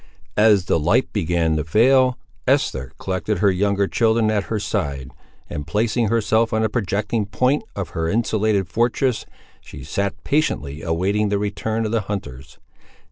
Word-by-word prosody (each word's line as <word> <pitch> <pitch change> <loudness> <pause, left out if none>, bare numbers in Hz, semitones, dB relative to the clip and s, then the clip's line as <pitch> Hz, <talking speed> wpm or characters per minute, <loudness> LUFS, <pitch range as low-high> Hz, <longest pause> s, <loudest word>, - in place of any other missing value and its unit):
As 105 -4 +5
the - - +1
light 75 - +1
began 80 -1 +1
to 75 - -1
fail, 125 +9 +4 0.3
Esther 65 0 +1
collected 95 +2 -2
her 100 +2 +3
younger 100 +1 +1
children 110 0 +2
at 105 -2 0
her 110 - -2
side, 75 -11 -3 0.4
and 75 0 -6
placing 110 +6 +1
herself 115 +1 +1
on 110 0 +1
a 110 - +1
projecting 105 0 -1
point 125 +8 +1
of 95 -5 -4
her 80 +2 -2
insulated 110 -3 +1
fortress, 120 - 0 0.3
she - - -11
sat 100 -1 -2
patiently 75 - -1
awaiting 95 +6 0
the 100 - +1
return 110 +2 -2
of 105 - -2
the 115 -1 +1
hunters. 70 -10 -7
105 Hz, 155 wpm, -21 LUFS, 85-110 Hz, 0.4 s, As